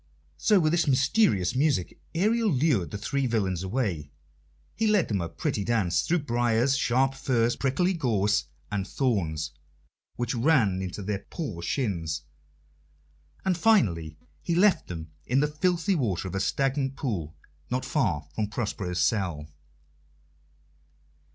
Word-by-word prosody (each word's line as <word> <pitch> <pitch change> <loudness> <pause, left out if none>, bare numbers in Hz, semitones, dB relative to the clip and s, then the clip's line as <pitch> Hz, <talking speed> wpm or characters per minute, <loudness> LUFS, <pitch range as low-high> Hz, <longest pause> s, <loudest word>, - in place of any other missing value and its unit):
So 210 -3 +4
with 155 -2 +2
his 170 -2 +2
mysterious 135 - +3
music 135 - 0
Ariel 220 +5 +2
lured 130 - +2
the 105 - -5
three 135 +6 -1
villains 95 -7 0
away. 95 - -2 0.6
He 225 - 0
led 210 -5 +3
them 100 -4 0
a 85 - -3
pretty 100 - -2
dance, 105 -6 +1
through 170 -2 0
briars, 120 +1 +2
sharp 135 +1 +2
furze, 120 -3 +1
prickly 145 +8 +1
gorse, 105 - +1 0.3
and 95 -2 -2
thorns, 80 - -1 0.6
which 120 0 -2
ran 115 - +2
into 95 +2 -5
their 100 0 -2
poor 110 - -5
shins; 85 - -2 1.2
and 190 -2 +2
finally 95 - +2 0.2
he 170 - -1
left 185 -2 +4
them 80 -2 -7 0.2
in 130 +3 +2
the 150 - +3
filthy 175 +5 +1
water 105 - -1
of 90 - -6
a 95 - -1
stagnant 135 +4 0
pool, 90 - -3 0.3
not 130 +1 -1
far 90 - 0
from 105 -1 -1
Prospero's 100 -4 -3
cell. 85 -9 -1
120 Hz, 140 wpm, -27 LUFS, 95-150 Hz, 1.2 s, So